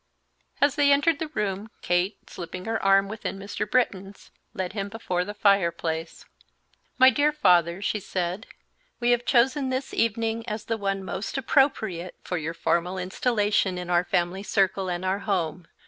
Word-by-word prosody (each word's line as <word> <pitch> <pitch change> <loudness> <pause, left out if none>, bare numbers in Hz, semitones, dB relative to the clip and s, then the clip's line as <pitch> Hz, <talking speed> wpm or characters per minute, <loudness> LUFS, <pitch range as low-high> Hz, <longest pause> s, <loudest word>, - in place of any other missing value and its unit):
As 285 -1 +4
they 285 -1 +3
entered 290 +2 +3
the 320 - -2
room, 210 -5 -3
Kate, 175 +3 +1
slipping 180 +1 -7
her 225 0 -1
arm 195 0 +4
within 210 -1 -5
Mr. 205 +2 -4
Britton's, 200 -5 -1 0.2
led 185 0 -4
him 200 -2 -3
before 185 -5 -2
the 205 +3 -7
fireplace. 170 -5 0 0.7
"My 260 0 +8
dear 295 +2 +2
father," 180 - +3
she 210 - 0
said, 185 +2 -3 0.5
"we 240 0 +2
have 240 0 +1
chosen 265 +3 +3
this 260 +1 -3
evening 230 0 0
as 215 0 -4
the 225 - -1
one 195 -1 -2
most 190 +7 -4
appropriate 220 - +1
for 180 - -3
your 165 +2 -4
formal 175 +3 0
installation 205 0 0
in 180 0 -5
our 175 0 +4
family 175 +2 -1
circle 195 -2 0
and 175 +1 -3
our 190 +2 0
home. 180 -4 -2
195 Hz, 160 wpm, -26 LUFS, 180-230 Hz, 0.7 s, My